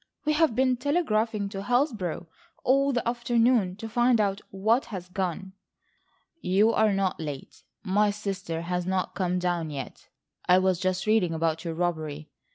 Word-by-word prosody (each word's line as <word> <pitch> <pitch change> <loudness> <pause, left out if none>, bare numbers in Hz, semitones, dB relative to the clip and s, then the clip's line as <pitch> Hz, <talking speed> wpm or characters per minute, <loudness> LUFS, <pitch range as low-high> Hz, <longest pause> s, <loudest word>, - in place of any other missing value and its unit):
We 305 - +2
have 300 -6 +2
been 255 -1 +2
telegraphing 230 - 0
to 195 -1 -6
Hillsborough 225 - 0 0.4
all 275 +2 +3
the 245 -3 -1
afternoon 235 -4 +2
to 225 +3 -7
find 240 +1 +3
out 200 -1 0
what 220 +6 +1
has 185 -5 -7
gone." 190 0 -3 0.9
"You 200 +5 +3
are 220 -1 +3
not 195 -2 0
late. 145 -4 -7 0.2
My 205 +1 +2
sister 195 -5 -4
has 180 +1 -2
not 190 -1 -1
come 180 -1 -1
down 175 -3 -1
yet. 140 -3 -7 0.4
I 180 - +6
was 185 -2 +2
just 185 0 -1
reading 215 -6 +2
about 160 0 -1
your 165 -2 -4
robbery. 155 -3 -3
195 Hz, 160 wpm, -27 LUFS, 180-230 Hz, 0.9 s, I